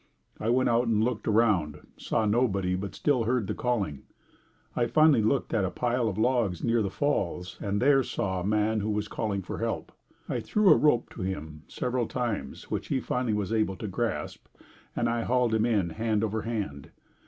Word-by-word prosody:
I 110 - -1
went 130 +2 +3
out 120 +1 +2
and 110 -1 +2
looked 120 -2 -2
around, 100 -9 +2
saw 110 - -1
nobody, 105 -5 +1
but 100 +1 -5
still 130 -6 +1
heard 120 -2 +1
the - - -2
calling. 100 - -1 0.7
I 120 - +1
finally 150 0 +5
looked 110 +5 0
at 110 -4 +2
a 95 - 0
pile 120 +2 0
of 100 - -5
logs 110 -6 +1
near 115 -1 +2
the 100 - -1
Falls 95 -7 -2
and 100 0 -1
there 135 +2 +5
saw 95 -6 -2
a - - -4
man 105 +2 +1
who 105 +1 -2
was 105 0 -1
calling 105 -3 -2
for - - -6
help. - - -3 0.4
I - - -1
threw 210 -3 +3
a - - +8
rope 135 -6 +2
to - - -8
him 80 -5 -5
several 125 -2 -2
times 110 - -4
which - - -2
he 135 - 0
finally 125 -3 -1
was 105 +1 -2
able 110 -3 +1
to 105 - -6
grasp 95 -6 -3 0.5
and 120 - +1
I 115 0 0
hauled 125 -1 +1
him 110 +1 +2
in 100 -7 +1
hand 110 +2 0
over 110 0 -1
hand. 100 -12 -4
110 Hz, 200 wpm, -28 LUFS, 100-120 Hz, 0.7 s, a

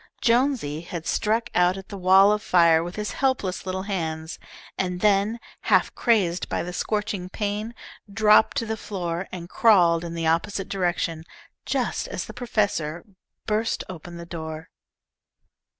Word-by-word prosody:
Jonesy 235 - +1
had 170 -1 -7
struck 225 +2 0
out 180 +1 +3
at 195 - -10
the 200 - -7
wall 190 +2 +6
of 210 0 0
fire 165 -4 +4
with 175 +1 -6
his 210 0 -3
helpless 245 -9 -1
little 190 0 -2
hands, 160 -5 -4 0.4
and 180 -1 -2
then, 210 +3 +2 0.3
half - - +3
crazed 190 -8 +1
by - - -1
the 180 +1 -6
scorching 210 -2 -2
pain, 210 +3 -3 0.4
dropped 215 +1 +4
to 230 - 0
the 220 0 -2
floor 180 -3 -4
and 175 -2 -7
crawled 175 -5 +4
in 170 -1 -6
the 165 -1 -2
opposite 170 +4 0
direction, 175 -4 -1 0.4
just - - -1
as - - -4
the - - -10
professor 205 -10 -1 0.4
burst 220 +1 0
open 175 -1 -9
the 170 - -8
door. 160 -1 -7
185 Hz, 150 wpm, -24 LUFS, 170-210 Hz, 0.4 s, wall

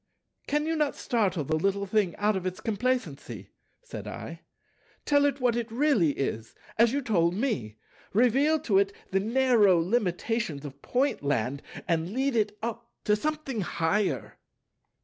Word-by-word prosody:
"Can 295 +1 +1
you 325 +1 0
not 300 -2 0
startle 195 - 0
the 155 +3 -1
little 195 +4 0
thing 195 -4 +1
out 210 0 +1
of 185 -1 -2
its 185 0 -4
complacency?" 225 - -2 0.3
said - - -8
I. - - -7 0.6
"Tell 285 -1 +4
it 285 0 0
what 245 -2 +2
it 235 -1 -3
really 235 - +3
is, 115 -5 -3 0.2
as 230 0 +6
you 280 +1 -1
told 175 -6 +2
me; 130 - -2 0.3
reveal 265 +8 +3
to 195 -4 +3
it 200 0 +2 0.2
the 195 - +2
narrow 225 -3 +4
limitations 185 - -1
of 140 0 -9
Pointland, 140 - 0 0.3
and 165 +2 0
lead 265 +1 0
it 210 -1 0
up 235 0 -4
to 210 - +3
something 300 -2 -2
higher." 180 +3 -1
215 Hz, 150 wpm, -28 LUFS, 175-255 Hz, 0.6 s, as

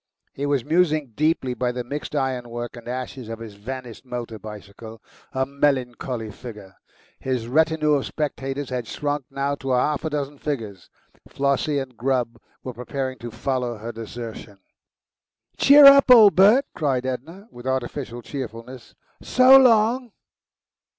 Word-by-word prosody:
He 140 +1 -3
was 140 -3 0
musing 155 -4 +1
deeply 150 -2 0
by 125 0 -1
the 125 0 -4
mixed 145 +4 -6
ironwork 120 -3 -3
and 120 -1 -12
ashes 125 -1 -6
of 115 - -5
his 115 -2 -9
vanished 120 +3 -8
motor 120 -3 -6
bicycle, 105 +2 -11 0.3
a 130 0 -1
melancholy 130 -5 -2
figure. 105 -4 -11 0.4
His 125 -3 -3
retinue 155 +2 +2
of 140 -2 0
spectators 140 -2 -4
had 125 -3 -3
shrunk 145 0 -3
now 140 0 -2
to 135 -2 -2
half 145 +4 +1
a 160 - -2
dozen 145 -1 -4
figures. 110 - -5 0.4
Flossie 140 +1 0
and 135 -2 -5
Grubb 120 -2 -1 0.2
were 130 - -6
preparing 130 +2 -5
to 120 - -7
follow 125 -1 -3
her 115 +3 -6
desertion. 115 -2 -8 1.0
"Cheer 285 +1 +8
up, 275 -1 +8
old 220 -5 +8
Bert!" 215 +9 +6
cried 135 -6 -1
Edna, 160 - -6
with 120 +1 -10
artificial 130 -1 -3
cheerfulness. 125 -2 -8 0.3
"So 255 +1 +6
long." 240 -2 +4
130 Hz, 145 wpm, -23 LUFS, 120-150 Hz, 1.0 s, Cheer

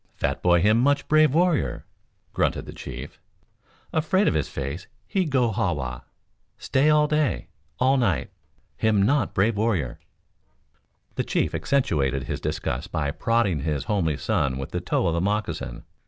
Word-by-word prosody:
Fat 70 - -2
boy 85 -1 +4
him 110 +2 +4
much 140 +3 +2
brave 155 -1 +5
warrior," 170 0 +1 0.5
grunted - - 0
the - - -9
chief. - - -8 0.7
"Afraid 165 +6 +2
Of - - +3
His 75 - -1
Face 70 +8 -5 0.2
he 190 -3 0
go 130 -6 +1
ha 95 -3 0
wa. 60 -4 -5 0.6
Stay 140 +3 +2
all 150 0 +5
day, 150 -1 0 0.3
all 130 +2 +3
night. 95 - 0 0.5
Him 105 -3 +2
not 125 0 +1
brave 105 +3 +2
warrior." 95 - 0 1.1
The - - -1
chief - - 0
accentuated 75 - 0
his - - -4
disgust 60 - -3
by 70 -2 -1
prodding 105 -2 +1
his 75 -1 -2
homely 80 -6 0
son 65 -2 0
with 70 +4 -6
the 90 - -2
toe 90 - 0
of 85 - +1
a 85 - 0
moccasin. 100 - -2
100 Hz, 155 wpm, -25 LUFS, -, 1.1 s, brave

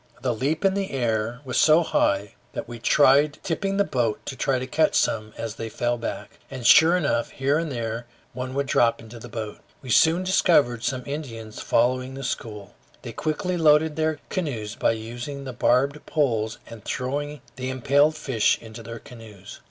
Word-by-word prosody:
The 125 -2 +1
leap 145 - -1
in 195 - +4
the 195 -1 -2
air 120 -1 -1
was 125 -2 0
so 160 +2 +6
high 100 -9 +1 0.2
that - - -5
we 120 -1 -8
tried 145 +4 +4
tipping 195 +3 -1
the 200 - +4
boat 120 - -1
to 130 -1 -1
catch 155 +4 +2
some 110 -1 +1
as 115 -2 -4
they 115 - -5
fell 120 +2 -1
back, 115 - -6
and 130 -3 -7
sure 165 +8 +7
enough, 140 -8 0
here 140 +3 0
and 165 -2 -3
there 115 -1 -4 0.3
one 130 +1 -5
would 140 0 0
drop 115 -3 +2
into 115 +1 -11
the 120 +2 -10
boat. 110 -2 -6 0.2
We 130 - -5
soon 165 +8 +4
discovered 155 -10 +3
some 130 -2 -2
Indians 115 -7 -6
following 130 +2 +1
the 135 - -7
school. 105 -5 -5 0.3
They - - -7
quickly 180 +4 -2
loaded 155 -1 +4
their 155 -1 0
canoes 120 - -3
by 115 - +1
using 120 +5 -6
the 130 -2 -6
barbed 135 +4 +1
pole 115 -8 +1 0.2
and 115 -3 -11
throwing 145 +2 -3
the 130 +1 -4
impaled 140 +4 +3
fish 125 -8 +1
into 115 0 -10
their 115 +1 -8
canoes. 110 -5 -12
130 Hz, 180 wpm, -24 LUFS, 115-150 Hz, 0.3 s, sure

